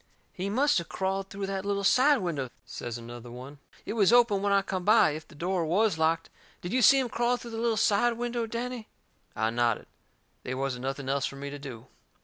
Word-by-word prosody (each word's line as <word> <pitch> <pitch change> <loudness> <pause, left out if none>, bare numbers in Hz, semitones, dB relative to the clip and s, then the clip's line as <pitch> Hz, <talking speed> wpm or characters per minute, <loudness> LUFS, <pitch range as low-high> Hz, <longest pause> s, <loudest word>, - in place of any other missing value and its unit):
"He 190 +2 -3
must 270 +2 +3
of 170 - -8
crawled 195 0 -2
through 200 0 -4
that 195 -1 -3
little 200 0 -1
side 275 +8 +5
window," 150 -8 -2 0.2
says 120 -1 -6
another 120 +1 -9
one. 130 +4 -10 0.3
"It - - -3
was 215 -3 +4
open 235 -5 +5
when 200 0 +1
I 200 -1 +4
come 190 -2 -3
by, 210 -5 +5
if 155 +1 -7
the - - -16
door 175 +3 -1
WAS 180 +2 +1
locked. 165 +1 +1 0.3
Did 175 - -5
you 255 - +3
see 275 +3 +7
him 260 -2 +1
crawl 240 +1 0
through 240 -1 -9
the 225 - -5
little 230 -1 +1
side 225 +3 +3
window, 240 0 -2
Danny?" 235 0 -5 0.5
I 110 +1 0
nodded. 120 0 0 0.6
They 130 - -4
wasn't 130 -1 -3
nothing 135 0 -4
else 140 +1 0
fur - - -8
me 140 +1 -6
to 145 - -7
do. 130 -4 -9
190 Hz, 220 wpm, -28 LUFS, 140-225 Hz, 0.6 s, see